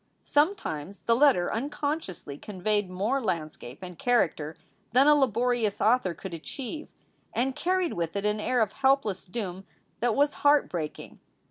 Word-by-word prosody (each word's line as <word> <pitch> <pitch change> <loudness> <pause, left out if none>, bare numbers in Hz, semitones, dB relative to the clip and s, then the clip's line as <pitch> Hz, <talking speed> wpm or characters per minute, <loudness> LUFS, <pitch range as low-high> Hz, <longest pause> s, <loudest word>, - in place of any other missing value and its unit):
Sometimes 245 - 0
the 230 - +3
letter 255 -9 +4
unconsciously 285 - -3
conveyed 205 +3 -1
more 210 +9 0
land 165 -8 -1
scape 125 +7 -11
and 180 -2 -9
character 160 -10 +1 0.4
than 260 +3 +6
a 300 - +7
laborious 245 -5 +1
author 220 -6 +3
could 190 +2 -8
achieve, 265 - -6 0.5
and 260 +3 0
carried 365 -1 0
with 170 0 -3
it 200 0 -2
an 210 0 +1
air 250 +3 +1
of 215 - -4
helpless 265 -8 +1
doom 190 -2 -5 0.4
that 235 -2 +1
was 285 +1 +3
heart 290 0 +4
breaking. 160 -4 -5
220 Hz, 150 wpm, -28 LUFS, 180-275 Hz, 0.5 s, a